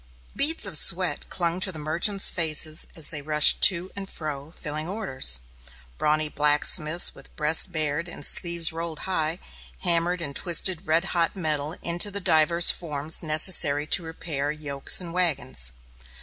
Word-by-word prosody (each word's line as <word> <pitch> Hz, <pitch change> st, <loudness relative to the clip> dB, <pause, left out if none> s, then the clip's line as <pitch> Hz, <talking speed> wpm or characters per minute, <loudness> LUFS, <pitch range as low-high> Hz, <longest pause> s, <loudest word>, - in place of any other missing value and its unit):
Beads 305 Hz, -2 st, +1 dB
of 175 Hz, -7 st, +3 dB
sweat 180 Hz, +1 st, +2 dB
clung 170 Hz, -1 st, -2 dB
to 190 Hz, 0 st, 0 dB
the 160 Hz, -, -10 dB
merchants' 170 Hz, +7 st, +2 dB
faces 155 Hz, -1 st, +1 dB
as 160 Hz, -3 st, +5 dB
they 150 Hz, -2 st, -5 dB
rushed 150 Hz, +1 st, +3 dB
to 185 Hz, 0 st, +3 dB
and 195 Hz, -1 st, -8 dB
fro, 150 Hz, -2 st, -6 dB
filling 155 Hz, -1 st, -7 dB
orders. 130 Hz, -, -1 dB, 0.6 s
Brawny 155 Hz, 0 st, -1 dB
blacksmiths, 150 Hz, +3 st, +1 dB
with -, -, -16 dB
breasts 155 Hz, +3 st, +3 dB
bared 155 Hz, -1 st, -4 dB
and -, -, -7 dB
sleeves 170 Hz, -2 st, +1 dB
rolled 165 Hz, -1 st, -7 dB
high, 165 Hz, -3 st, -3 dB, 0.4 s
hammered 175 Hz, 0 st, -1 dB
and 145 Hz, -4 st, -5 dB
twisted 180 Hz, +1 st, 0 dB
red 165 Hz, +3 st, 0 dB
hot 170 Hz, +1 st, 0 dB
metal 155 Hz, -4 st, -3 dB
into 175 Hz, +4 st, +1 dB
the 200 Hz, 0 st, -4 dB
divers 170 Hz, -1 st, +3 dB
forms 155 Hz, -2 st, +1 dB
necessary 155 Hz, -2 st, +4 dB
to 160 Hz, -, 0 dB
repair 160 Hz, -3 st, -6 dB
yokes 150 Hz, -2 st, 0 dB
and 170 Hz, -2 st, -9 dB
wagons. 130 Hz, -, -2 dB
160 Hz, 150 wpm, -23 LUFS, 150-175 Hz, 0.6 s, as